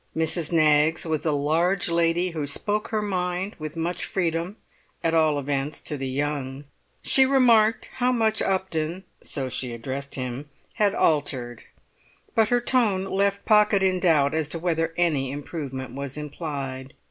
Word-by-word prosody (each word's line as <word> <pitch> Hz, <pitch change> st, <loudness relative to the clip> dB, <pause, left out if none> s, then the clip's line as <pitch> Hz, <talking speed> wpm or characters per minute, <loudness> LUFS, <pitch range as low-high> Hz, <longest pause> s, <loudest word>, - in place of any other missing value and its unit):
Mrs. 160 Hz, 0 st, +1 dB
Knaggs 155 Hz, 0 st, +3 dB
was 160 Hz, -1 st, -1 dB
a -, -, +3 dB
large 160 Hz, +6 st, +1 dB
lady 170 Hz, +1 st, +1 dB
who 155 Hz, -3 st, -3 dB
spoke 210 Hz, +9 st, -1 dB
her 215 Hz, -1 st, -1 dB
mind 185 Hz, 0 st, -2 dB
with 155 Hz, +1 st, -6 dB
much 170 Hz, +2 st, -2 dB
freedom, 170 Hz, +2 st, -2 dB, 0.5 s
at 165 Hz, -, +1 dB
all 155 Hz, -2 st, +3 dB
events 140 Hz, +1 st, -2 dB
to 150 Hz, -, -3 dB
the 135 Hz, -2 st, -4 dB
young. 140 Hz, 0 st, -3 dB, 0.4 s
She 265 Hz, -, +5 dB
remarked 235 Hz, -5 st, +4 dB
how 250 Hz, 0 st, +2 dB
much 220 Hz, -3 st, +1 dB
Upton 185 Hz, -2 st, -1 dB, 0.2 s
(so 135 Hz, -3 st, -3 dB
she 125 Hz, -1 st, -4 dB
addressed 135 Hz, +4 st, -5 dB
him) 130 Hz, +2 st, -5 dB, 0.2 s
had 205 Hz, -1 st, +1 dB
altered; 130 Hz, -6 st, 0 dB, 0.7 s
but 220 Hz, -1 st, +3 dB
her 245 Hz, 0 st, +2 dB
tone 225 Hz, -7 st, +2 dB
left 200 Hz, +1 st, 0 dB
Pocket 210 Hz, -2 st, +4 dB
in 185 Hz, -1 st, +2 dB
doubt 155 Hz, -6 st, +3 dB
as 160 Hz, -2 st, -1 dB
to 165 Hz, -, -1 dB
whether 165 Hz, -1 st, -1 dB
any 150 Hz, -7 st, +1 dB
improvement 135 Hz, -2 st, -6 dB
was 140 Hz, +1 st, -5 dB
implied. 140 Hz, -3 st, -6 dB
160 Hz, 155 wpm, -25 LUFS, 145-190 Hz, 0.7 s, She